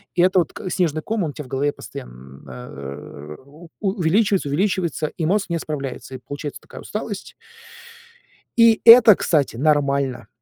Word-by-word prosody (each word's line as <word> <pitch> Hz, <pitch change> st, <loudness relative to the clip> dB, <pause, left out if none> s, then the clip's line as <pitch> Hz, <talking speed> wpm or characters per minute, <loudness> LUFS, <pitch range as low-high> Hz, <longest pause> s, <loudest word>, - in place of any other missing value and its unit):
И 175 Hz, -, +3 dB
это 185 Hz, +1 st, +4 dB
вот 170 Hz, -, -2 dB
к 185 Hz, -, -6 dB
снежный 160 Hz, -4 st, 0 dB
ком, 220 Hz, -3 st, -2 dB
он 155 Hz, -, -2 dB
у -, -, -16 dB
тя 150 Hz, -, -7 dB
в -, -, -14 dB
голове 135 Hz, +3 st, -1 dB
постоян 65 Hz, +2 st, -11 dB
э, 70 Hz, +3 st, -9 dB
у 155 Hz, +4 st, -16 dB
увеличивается, 195 Hz, -3 st, +1 dB
увеличивается, 170 Hz, -1 st, -1 dB
и 165 Hz, -, -1 dB
мозг 200 Hz, +1 st, 0 dB
не 170 Hz, -, -1 dB
справляется, 140 Hz, -4 st, -6 dB
и -, -, -8 dB
получается 145 Hz, +3 st, -7 dB
такая -, -, -12 dB
усталость. 210 Hz, -1 st, -6 dB, 1.2 s
И 230 Hz, -2 st, +5 dB
это, 230 Hz, -2 st, +9 dB
кстати, 145 Hz, -10 st, 0 dB
нормально. 140 Hz, -4 st, 0 dB
155 Hz, 160 wpm, -21 LUFS, 135-190 Hz, 1.2 s, это